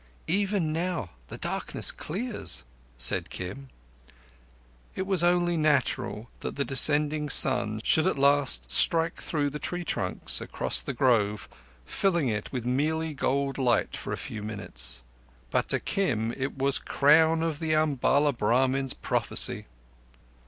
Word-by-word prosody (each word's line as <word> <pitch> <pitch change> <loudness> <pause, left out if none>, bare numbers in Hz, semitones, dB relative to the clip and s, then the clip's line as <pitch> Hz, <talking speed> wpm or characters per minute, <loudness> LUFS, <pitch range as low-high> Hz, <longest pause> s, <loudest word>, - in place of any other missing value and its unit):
"Even 195 -5 0
now 165 - -3 0.2
the - - -8
darkness - - -1
clears," 215 +8 -3 0.3
said - - +2
Kim. 130 +10 -7 1.3
It 190 - -2
was 190 -3 0
only 175 0 +2
natural 150 -7 0
that - - -6
the 140 - -2
descending 150 +2 +3
sun 110 -6 +4
should 160 +9 +3
at 190 - 0
last 135 - +3
strike 165 - +3
through 145 -3 -2
the 150 - -6
tree 175 +4 -4
trunks, - - -1
across - - -1
the 140 - -6
grove, 110 -5 +1 0.4
filling 170 - 0
it 105 -1 -4
with 125 -3 -4
mealy 155 +5 -1
gold 140 0 -1
light 125 -3 +1
for - - -6
a - - -3
few 110 - -7
minutes; 65 - -2 0.5
but - - 0
to - - +3
Kim 115 - -1
it 135 +2 -5
was 135 +1 +2
the - - -23
crown 160 +3 +3
of 160 -3 -2
the 160 -1 -1
Umballa 145 -1 +2
Brahmin's 130 +4 0
prophecy. - - 0
140 Hz, 140 wpm, -27 LUFS, 120-160 Hz, 1.3 s, sun